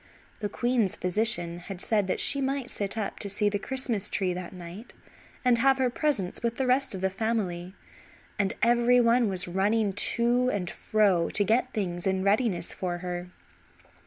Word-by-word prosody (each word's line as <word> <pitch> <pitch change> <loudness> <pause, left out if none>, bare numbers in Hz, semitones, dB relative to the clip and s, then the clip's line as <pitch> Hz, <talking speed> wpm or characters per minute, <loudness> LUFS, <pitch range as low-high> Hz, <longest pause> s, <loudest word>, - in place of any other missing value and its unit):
The 205 - -3
queen's 240 -3 0
physician 180 -2 0
had 180 +1 -8
said 205 -1 0
that 185 - -1
she 280 - +4
might 270 -1 -2
sit 200 +2 -3
up 210 -3 -3
to 200 - -4
see 205 +1 +2
the 205 0 -2
Christmas 235 -4 0
Tree 185 -2 -1
that 180 0 -6
night, 180 +5 -10 0.5
and 245 -2 +4
have 270 +2 +4
her 255 -2 +1
presents 245 - -1
with 235 0 -1
the 265 - 0
rest 260 -2 +1
of 185 - -6
the 190 0 0
family; 190 -4 -2 0.6
and 195 -1 +1
every 240 +1 +4
one 235 -1 +3
was 185 -2 -1
running 200 +3 +1
to 240 +4 +2
and 190 -6 -2
fro 195 -6 +1
to 205 - +1
get 235 +5 +1
things 180 -4 -3
in 190 0 0
readiness 200 -4 +1
for 175 -2 -3
her. 175 0 -4
205 Hz, 180 wpm, -27 LUFS, 185-240 Hz, 0.6 s, she